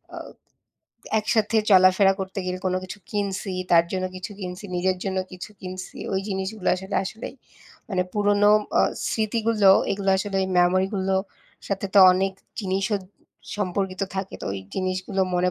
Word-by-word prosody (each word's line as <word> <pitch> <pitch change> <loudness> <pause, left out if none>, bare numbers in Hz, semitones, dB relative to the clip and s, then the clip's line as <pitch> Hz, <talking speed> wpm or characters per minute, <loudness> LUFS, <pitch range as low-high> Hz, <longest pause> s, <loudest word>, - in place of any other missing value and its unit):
অ - - -8 1.0
একসাথে 215 +1 +1
চলাফেরা 190 +1 +6
করতে 190 +1 -5
গেলে 185 0 -2
কোনো 185 0 +1
কিছু 185 +3 -8
কিনছি, 200 -1 -2 0.2
তার 170 -1 +7
জন্য 185 -1 -1
কিছু 185 +3 -6
কিনছি, 180 +1 -6
নিজের 185 +1 +1
জন্য 190 -1 -1
কিছু 180 +2 -8
কিনছি, 185 0 -7 0.2
ওই 190 - +1
জিনিসগুলো 190 0 -3
আসলে 190 +2 -4
আসলেই 220 +6 -7 0.6
মানে 185 -2 +1
পুরনো 205 0 +4 0.3
অ - - +6 0.3
স্মৃতিগুলো 220 -2 +2 0.2
এগুলো 195 0 0
আসলে 195 0 -2
ওই - - 0
মেমোরিগুলোর 190 +1 +2 0.5
সাথে 200 0 -2
তো - - +7
অনেক 190 +1 0 0.3
জিনিসও 195 +1 0 0.6
সম্পর্কিত 190 -1 -2
থাকে, 190 0 -4
তো - - -4
ওই 100 - -4 0.2
জিনিসগুলো 185 +1 -2
মনে 180 +1 +2
190 Hz, 145 wpm, -24 LUFS, 185-205 Hz, 1.0 s, তার